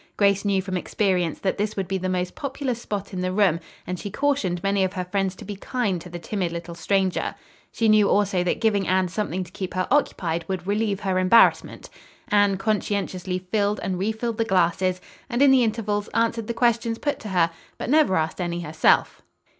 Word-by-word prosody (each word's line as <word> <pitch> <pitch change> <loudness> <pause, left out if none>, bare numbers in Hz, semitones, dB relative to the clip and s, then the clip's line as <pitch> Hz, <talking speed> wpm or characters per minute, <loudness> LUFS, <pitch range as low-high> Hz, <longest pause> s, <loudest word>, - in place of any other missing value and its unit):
Grace 200 -1 +3
knew 195 -2 +1
from 185 -1 -3
experience 180 -3 0
that 195 0 -2
this 210 +1 -1
would 195 -3 -2
be 195 -1 -1
the 185 0 -2
most 180 -1 -1
popular 275 -2 -3
spot 205 -4 -5
in 185 - -3
the 185 0 -1
room, 185 -4 +3 0.3
and 180 -1 -4
she 205 - -5
cautioned 220 -9 0
many 200 0 +2
of 185 0 -1
her 185 -2 -3
friends 195 0 -1
to - - -11
be 205 +1 -5
kind 200 -4 -2
to 180 - -10
the 175 - -6
timid 175 +1 -3
little 170 0 -6
stranger. 190 +2 0 0.4
She 225 - 0
knew 215 -2 +5
also 195 -3 +2
that 180 - -1
giving 205 -4 +1
Anne 185 0 +2
something 185 -1 -2
to 175 - -13
keep 185 -1 -6
her 185 0 0
occupied 170 - +1
would 185 -2 -3
relieve 205 0 0
her 190 -2 0
embarrassment. 185 +5 +4 0.4
Anne 205 -1 +3
conscientiously 195 -3 -1
filled 210 -1 +1
and 185 -2 -2
refilled 220 +3 -2
the - - +4
glasses, 185 -2 +1 0.3
and 240 -1 -1
in 280 - +7
the 260 -2 +5
intervals 215 -2 -1
answered 230 -1 +1
the 235 - -3
questions 230 -1 +1
put 290 +4 -2
to 215 - -7
her; 170 -3 +2 0.3
but - - -5
never 295 -7 +4
asked 160 +3 -1
any 175 0 -2
herself. 160 -1 +2
195 Hz, 205 wpm, -24 LUFS, 180-215 Hz, 0.4 s, in